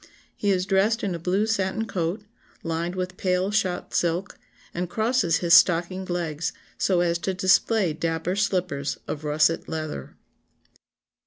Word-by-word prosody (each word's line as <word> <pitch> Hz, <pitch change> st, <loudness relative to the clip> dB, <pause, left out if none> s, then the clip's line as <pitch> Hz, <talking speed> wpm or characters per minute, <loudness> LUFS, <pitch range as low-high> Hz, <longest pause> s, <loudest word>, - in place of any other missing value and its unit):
He 205 Hz, -, -1 dB
is 185 Hz, -2 st, +2 dB
dressed 200 Hz, +4 st, +2 dB
in 195 Hz, -3 st, -1 dB
a 170 Hz, -, -4 dB
blue 185 Hz, +5 st, +1 dB
satin 220 Hz, 0 st, -1 dB
coat, 180 Hz, 0 st, -2 dB, 0.4 s
lined 165 Hz, +2 st, -2 dB
with 180 Hz, 0 st, -4 dB
pale 185 Hz, +1 st, 0 dB
shot 190 Hz, -4 st, -1 dB
silk, 175 Hz, +3 st, 0 dB, 0.4 s
and 175 Hz, 0 st, -3 dB
crosses 220 Hz, -6 st, +1 dB
his 170 Hz, -, +4 dB
stockinged 180 Hz, +2 st, +4 dB
legs 165 Hz, -3 st, -2 dB, 0.2 s
so 180 Hz, -3 st, +2 dB
as 170 Hz, -1 st, +1 dB
to 190 Hz, +2 st, -2 dB
display 190 Hz, 0 st, +3 dB
dapper 165 Hz, +3 st, -2 dB
slippers 180 Hz, -8 st, -1 dB
of 150 Hz, -, -5 dB
russet 155 Hz, +2 st, +1 dB
leather." 155 Hz, -, -5 dB
180 Hz, 145 wpm, -25 LUFS, 165-195 Hz, 0.4 s, his